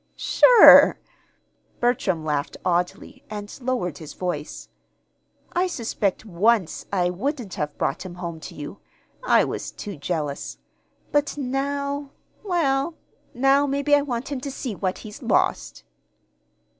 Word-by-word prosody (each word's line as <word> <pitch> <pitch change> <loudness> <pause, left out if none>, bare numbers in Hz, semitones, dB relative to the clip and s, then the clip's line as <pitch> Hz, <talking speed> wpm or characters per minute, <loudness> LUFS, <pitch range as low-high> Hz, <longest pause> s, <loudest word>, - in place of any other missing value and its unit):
"Sure!" - - +8 0.8
Bertram 195 -9 0
laughed 150 -1 -2
oddly, 180 0 -2
and 205 -1 -7
lowered 240 - -2
his 155 -2 -9
voice. 175 -5 -5 0.9
"I 360 +1 +1
suspect 220 - -2
once 210 0 +1
I 180 -3 +1
wouldn't 240 - -4
have 150 -1 -4
brought 135 - -2
him 180 -2 -8
home 170 -2 -6
to - - -10
you. 150 +7 -8 0.4
I - - +4
was - - -4
too 205 -2 -7
jealous. 145 -2 -4 0.5
But 290 0 0
now 280 +1 -2 0.3
well, 320 -5 0 0.4
now 270 +3 +3
maybe 280 +1 0
I 290 - +6
want 270 -1 -4
him 270 -3 -3
to 280 - -5
see 260 -3 -5
what 185 -1 -2
he's 210 -1 -10
lost." 60 +1 0
220 Hz, 130 wpm, -23 LUFS, 175-280 Hz, 0.9 s, Sure